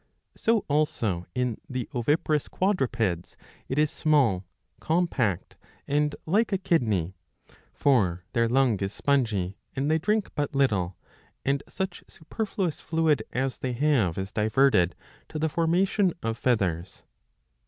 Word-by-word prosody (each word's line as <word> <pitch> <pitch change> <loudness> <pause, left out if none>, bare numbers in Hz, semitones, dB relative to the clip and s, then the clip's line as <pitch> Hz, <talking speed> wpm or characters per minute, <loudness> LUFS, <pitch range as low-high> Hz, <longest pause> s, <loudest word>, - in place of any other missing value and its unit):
So 225 -2 +1
also 115 - 0
in 125 -3 -1
the 130 -2 -3
oviparous 150 +4 +1
quadrupeds 120 - 0 0.3
it 130 - -2
is 150 0 +3
small, 125 - +2 0.3
compact, 155 - 0 0.3
and 150 +1 +1
like 215 +7 +2
a 195 - +2
kidney. 110 - +1 0.6
For 95 -11 +2
their 115 0 +2
lung 125 -4 +3
is 95 0 -2
spongy, 115 -10 +1
^^ - - -11 0.2
and 140 +3 0
they 160 - +3
drink 210 +5 0
but 145 -1 -2
little, 100 - +1 0.5
and 140 0 +1
such 190 -2 -4
superfluous 185 0 -3
fluid 160 -5 +1
as 130 0 -2
they 130 -1 -2
have 125 - +2
is 95 +1 -4
diverted 110 -5 +3 0.3
to 155 - -5
the 160 +1 0
formation 180 +4 +2
of 115 0 -1
feathers. 95 -9 -1
135 Hz, 130 wpm, -27 LUFS, 105-160 Hz, 0.6 s, is